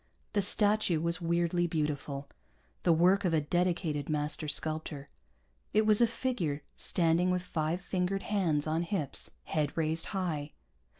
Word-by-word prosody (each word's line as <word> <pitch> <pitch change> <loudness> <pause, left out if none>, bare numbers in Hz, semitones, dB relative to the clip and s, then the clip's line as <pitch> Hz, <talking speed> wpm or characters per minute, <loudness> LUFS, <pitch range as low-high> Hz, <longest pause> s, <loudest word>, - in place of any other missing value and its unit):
The 205 - +3
statue 205 -3 +2
was 170 +2 -1
weirdly 170 +1 +1
beautiful, 150 -3 -2 0.5
the 175 - +3
work 180 +5 +4
of 175 -3 +2
a - - +4
dedicated 165 -2 0
master 150 0 -1
sculptor. 155 -2 -2 0.6
It 215 0 +4
was 215 +1 +5
a 235 - +6
figure, 190 - -2
standing 170 +1 +2
with 180 0 0
five 165 0 -2
fingered 185 +1 -1
hands 170 -8 +1
on 160 +1 0
hips, 170 -6 -2
head 150 -2 -1
raised 160 0 0
high. 160 -7 -3
170 Hz, 140 wpm, -31 LUFS, 155-185 Hz, 0.6 s, a